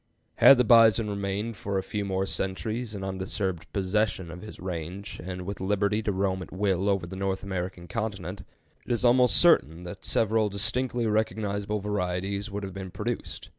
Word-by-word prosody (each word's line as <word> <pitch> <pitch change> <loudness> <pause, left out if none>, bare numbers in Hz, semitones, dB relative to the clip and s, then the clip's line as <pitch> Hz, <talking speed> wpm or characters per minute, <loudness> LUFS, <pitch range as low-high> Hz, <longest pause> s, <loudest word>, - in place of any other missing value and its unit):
Had 135 - +9
the 125 - +4
bison 115 -2 +6
remained 100 +3 -3
for 100 -1 -3
a 95 - -1
few 105 +1 -3
more 95 -1 -1
centuries 110 +5 -3
in 95 - -5
undisturbed 95 -1 -3
possession 95 -2 0
of 90 +2 -9
his 110 - -10
range, 90 +3 -5
and 90 +1 -5
with 100 0 -5
liberty 100 +2 +1
to 105 - -1
roam 95 -1 0
at - - -9
will 95 0 0
over 95 -3 +1
the 90 +2 -8
North 95 0 -2
American 90 -2 -4
continent, 100 -4 -4 0.4
it - - -6
is 120 +1 +1
almost 125 +1 +5
certain 90 - +4
that 90 - -8
several 110 -1 +2
distinctly 115 +5 -1
recognizable 105 -1 -1
varieties 100 0 -2
would 100 0 -5
have 95 -1 -6
been 95 -1 -6
produced. 105 +5 -5
100 Hz, 175 wpm, -27 LUFS, 95-110 Hz, 0.4 s, Had